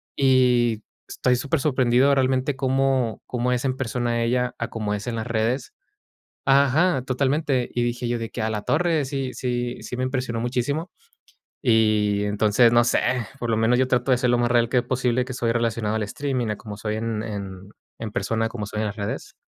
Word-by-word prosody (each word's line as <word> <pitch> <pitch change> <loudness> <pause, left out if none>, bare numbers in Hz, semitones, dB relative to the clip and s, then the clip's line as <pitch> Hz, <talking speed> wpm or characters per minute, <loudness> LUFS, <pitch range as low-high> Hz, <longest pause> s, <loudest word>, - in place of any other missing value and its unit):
Y 125 -4 +3 0.2
estoy 125 0 +1
súper 140 +4 -1
sorprendido 130 -1 +3
realmente 130 +1 +1
cómo 130 -3 0
cómo 125 0 -1
es 125 +1 0
en 130 -1 -1
persona 120 -2 -1
ella 125 +1 0
a 115 - -3
cómo 105 -2 -3
es 105 - -6
en 120 - -3
las 110 +1 -4
redes. 115 - -1 0.7
Ajá, 140 +2 +3
totalmente, 135 0 0
y 120 - 0
dije 120 0 -2
yo 120 0 0
de 115 -1 -5
que: 120 - -4
"Ah, 110 - 0
la 105 -1 -3
torre". 160 0 +1
Sí 135 -1 -3
sí 120 -1 -2
sí - - -6
me 125 - -3
impresionó 125 -3 -2
muchísimo. 130 +8 -2 0.7
Y 110 -4 +3
entonces, 105 +3 +3
no 120 - +5
sé, 120 - +2 0.4
por 120 -2 -2
lo - - +2
menos 115 +2 +3
yo 130 0 +2
trato 125 +1 0
de 125 - +5
ser 125 -1 +1
lo 120 - +2
más 120 0 +1
real 120 -1 +3
que 125 - 0
es - - -2
posible, 125 0 0
que 130 - -7
estoy 115 -2 0
relacionado 115 -2 -1
al 110 - -1
streaming, 130 +2 -2
a 105 - -1
como 105 -2 -8
soy 105 0 -3
en 110 -1 -2
en 100 -3 -7 0.3
en 110 -2 -5
persona, 115 -1 -1
a - - -9
como 105 -3 -5
soy 105 +1 -5
en 110 - 0
las 100 - -5
redes. 100 - -5
120 Hz, 210 wpm, -23 LUFS, 115-130 Hz, 0.7 s, no